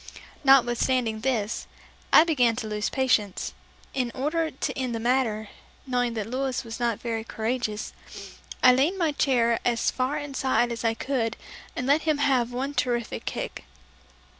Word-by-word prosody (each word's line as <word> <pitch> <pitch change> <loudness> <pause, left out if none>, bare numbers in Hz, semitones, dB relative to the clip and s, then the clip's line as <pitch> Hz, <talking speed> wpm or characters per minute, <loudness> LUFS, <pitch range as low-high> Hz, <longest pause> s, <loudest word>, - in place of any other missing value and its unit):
Notwithstanding 250 -3 +3
this, 225 -3 -1 0.4
I - - +9
began 250 -9 +2
to 225 -2 -4
lose 210 -1 -1
patience, 225 -8 0 0.4
and 250 -3 -1
in - - -11
order 315 +4 0
to 270 - -4
end 255 -3 -2
the - - -2
matter, 225 -3 0 0.4
knowing 245 -2 0
that 215 -2 -2
Louis 260 +2 -2
was 230 0 -7
not 235 -3 0
very 225 -2 -3
courageous, 220 -1 -3 0.7
I 255 - +9
leaned 290 +9 +2
my 330 -4 +1
chair 240 -5 +2
as 235 -1 +1
far 260 +3 -1
inside 265 -4 0
as 235 - -4
I 225 -1 +1
could 235 -3 -1 0.4
and 250 - -3
let 285 +4 +4
him 310 -2 +1
have 260 -4 +2
one 265 +3 -3
terrific 240 -4 -1
kick. - - -5
245 Hz, 160 wpm, -26 LUFS, 230-270 Hz, 0.7 s, I